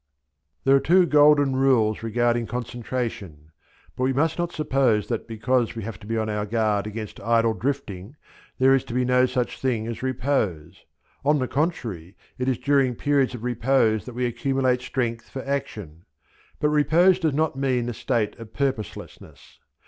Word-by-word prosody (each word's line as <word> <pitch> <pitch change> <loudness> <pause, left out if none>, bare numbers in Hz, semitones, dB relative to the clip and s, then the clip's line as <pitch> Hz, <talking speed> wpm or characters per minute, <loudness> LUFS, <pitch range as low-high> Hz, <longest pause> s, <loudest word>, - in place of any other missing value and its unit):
These 135 - +2
are 135 - +6
the - - -9
two 180 +2 +5
golden 145 -3 +4
rules 125 -5 +2
regarding 120 +1 0
concentration; 115 - -5 0.4
but 130 - -2
we 135 - +1
must 160 +5 0
not 175 0 -1
suppose 135 -9 +1
that 115 -2 -3
because 115 +1 0
we 115 - -5
have 115 +2 -7
to 105 - -13
be 115 0 -1
on 110 -1 -1
our 105 -1 -2
guard 105 -2 0
against 110 0 -7
idle 115 -1 +2
drifting 120 -4 -4 0.4
there 130 +1 +5
is 135 - +2
to 120 - -6
be 125 0 +1
no 125 0 +3
such 125 -1 -2
thing 120 -5 -1
as 115 0 -5
repose; 110 - -2 0.4
on 150 +2 +3
the 130 -2 -1
contrary 115 - -3 0.2
it 130 +1 0
is 130 - 0
during 135 -3 +2
periods 140 -1 +1
of 115 - -9
repose 120 -3 +1
that 125 - -9
we 125 0 -1
accumulate 130 +1 0
strength 120 -2 -3
for 130 - -7
action; 105 - -5 0.6
but 150 - +2
repose 165 +5 +4
does 160 -5 0
not 155 -1 0
mean 130 -3 0
a 120 - -3
state 110 -3 -1
of 110 -1 -11
purposelessness. 135 -6 -5
125 Hz, 175 wpm, -24 LUFS, 110-135 Hz, 0.6 s, are